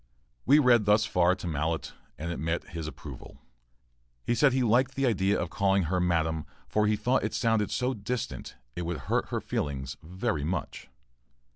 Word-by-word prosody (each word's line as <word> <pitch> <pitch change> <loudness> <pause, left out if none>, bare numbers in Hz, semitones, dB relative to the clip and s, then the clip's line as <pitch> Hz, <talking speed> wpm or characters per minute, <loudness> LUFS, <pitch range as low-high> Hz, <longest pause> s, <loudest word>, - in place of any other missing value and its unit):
[We 145 - +7
read 125 -7 +5
thus 105 +2 +4
far 90 -1 +3
to - - -9
Mallett, 80 0 -2 0.2
and 85 +3 -4
it 85 - -4
met 80 +2 -2
his 80 -2 -5
approval. 75 - -10 0.9
He - - +1
said 140 +3 +4
he 130 0 +1
liked 125 +3 +2
the 135 - +1
idea 100 -4 +2
of 85 -1 -3
calling 95 +3 +2
her 90 +3 0
"madam," 80 -3 0 0.2
for 105 0 +1
he 105 - +3
thought 120 +5 +1
it - - -2
sounded 110 -3 +1
so 125 +1 0
"distant," 115 - -4 0.2
it 90 - -3
would 85 -1 -3
hurt - - +1
her - - -1
feelings 65 -2 -3
very 90 0 -2
much. 90 +5 -4
95 Hz, 180 wpm, -28 LUFS, 80-115 Hz, 0.9 s, We